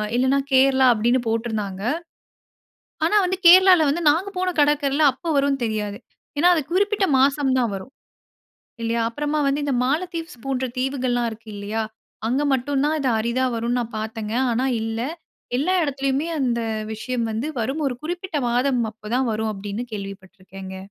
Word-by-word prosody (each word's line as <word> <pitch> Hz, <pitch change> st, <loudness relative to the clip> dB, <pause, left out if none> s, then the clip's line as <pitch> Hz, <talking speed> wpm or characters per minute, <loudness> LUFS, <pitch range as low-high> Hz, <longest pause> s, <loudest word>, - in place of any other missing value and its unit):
இல்லனா 260 Hz, +3 st, +3 dB, 0.2 s
கேரளா 265 Hz, 0 st, +5 dB
அப்டின்னு 235 Hz, +3 st, +2 dB
போட்டுருந்தாங்க. 220 Hz, -4 st, -2 dB, 1.2 s
ஆனா 340 Hz, +6 st, +3 dB
வந்து, 370 Hz, +1 st, 0 dB
கேரளால 365 Hz, -2 st, +8 dB
வந்து 335 Hz, +5 st, -1 dB
நாங்க 345 Hz, +7 st, 0 dB
போன 370 Hz, 0 st, 0 dB
கடற்கரைல 290 Hz, 0 st, +2 dB
அப்ப 265 Hz, -, -15 dB
வரும்னு 275 Hz, -2 st, +1 dB
தெரியாது. 210 Hz, -2 st, -3 dB, 0.4 s
ஏன்னா 345 Hz, +4 st, +5 dB
அது 320 Hz, -, +1 dB
குறிப்பிட்ட 405 Hz, +1 st, +2 dB
மாசம் 275 Hz, 0 st, +3 dB
தான் 235 Hz, -5 st, +1 dB
வரும். 195 Hz, +8 st, -8 dB, 0.9 s
இல்லையா? 230 Hz, 0 st, 0 dB
அப்றமா 295 Hz, +5 st, -2 dB
வந்து 285 Hz, +1 st, 0 dB
இந்த 280 Hz, -, 0 dB
மாலத்தீவ்ஸ் 330 Hz, 0 st, -2 dB
போன்ற 265 Hz, -1 st, -1 dB
தீவுகள்லாம் 255 Hz, -2 st, 0 dB
இருக்கு 220 Hz, 0 st, -11 dB
இல்லையா? 205 Hz, +2 st, -3 dB, 0.5 s
அங்க 255 Hz, +5 st, +1 dB
மட்டும் 270 Hz, +2 st, 0 dB
தான் 310 Hz, -, +1 dB
இது 265 Hz, -2 st, +1 dB
அரிதா 235 Hz, +3 st, 0 dB
வரும்னு 235 Hz, +2 st, -1 dB
நான் 235 Hz, 0 st, -7 dB
பாத்தேன்ங்க. 220 Hz, 0 st, -4 dB, 0.2 s
ஆனா 245 Hz, +3 st, 0 dB, 0.2 s
இல்ல, 225 Hz, 0 st, -3 dB, 0.6 s
எல்லா 345 Hz, +8 st, +1 dB
எடத்துலயுமே 275 Hz, +1 st, -1 dB
அந்த 245 Hz, -3 st, 0 dB, 0.3 s
விஷயம் 235 Hz, +2 st, -3 dB
வந்து 225 Hz, +7 st, -2 dB
வரும். 270 Hz, +7 st, -2 dB
ஒரு 250 Hz, -, -2 dB
குறிப்பிட்ட 350 Hz, 0 st, -4 dB
மாதம் 250 Hz, +1 st, +1 dB
அப்போ 215 Hz, 0 st, -21 dB
தான் 255 Hz, -1 st, +1 dB
வரும் 220 Hz, 0 st, -1 dB
அப்டின்னு 205 Hz, +4 st, -5 dB
கேள்விப்பட்டுருக்கேங்க. 195 Hz, -1 st, -8 dB
255 Hz, 150 wpm, -22 LUFS, 225-290 Hz, 1.2 s, கேரளால